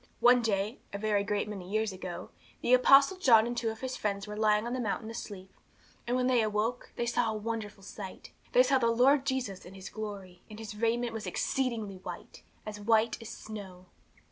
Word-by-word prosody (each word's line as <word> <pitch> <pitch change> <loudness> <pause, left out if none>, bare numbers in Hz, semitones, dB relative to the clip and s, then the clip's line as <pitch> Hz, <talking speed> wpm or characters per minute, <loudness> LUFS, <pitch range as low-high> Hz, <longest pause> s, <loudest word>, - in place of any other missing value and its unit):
One 245 0 +6
day, 210 +1 -1
a 200 - -4
very 205 -1 +1
great 205 0 -1
many 195 -4 -7
years 215 0 0
ago, 185 -2 -7 0.3
the 245 - +2
Apostle 275 +7 +6
John 230 -10 +6
and 240 +1 -3
two 235 -1 0
of 220 0 -7
his 260 -1 -3
friends 200 -2 -2
were 210 0 -6
lying 215 0 +3
on 240 - -3
the 255 - -2
mountain 220 0 -2
asleep, 190 -4 -8 0.5
and 245 +1 +1
when 250 - +1
they 250 -2 +4
awoke, 220 +3 -1
they 240 - -1
saw 235 -1 +1
a 215 - -3
wonderful 215 -2 -5
sight. 195 -1 -9 0.2
They - - +7
saw 270 - +3
the 235 - +2
Lord 265 +4 +4
Jesus 255 -8 -2
in 190 - -12
His 190 -1 -8
glory, 200 -4 -7
and 215 - -9
His 220 -2 -7
raiment 230 +2 0
was 225 -1 -5
exceeding 250 -4 -1 0.2
white - - -9 0.2
as 210 -1 -6
white 225 +2 +2
as 225 - -8
snow. 195 -5 -9
220 Hz, 205 wpm, -30 LUFS, 205-240 Hz, 0.5 s, They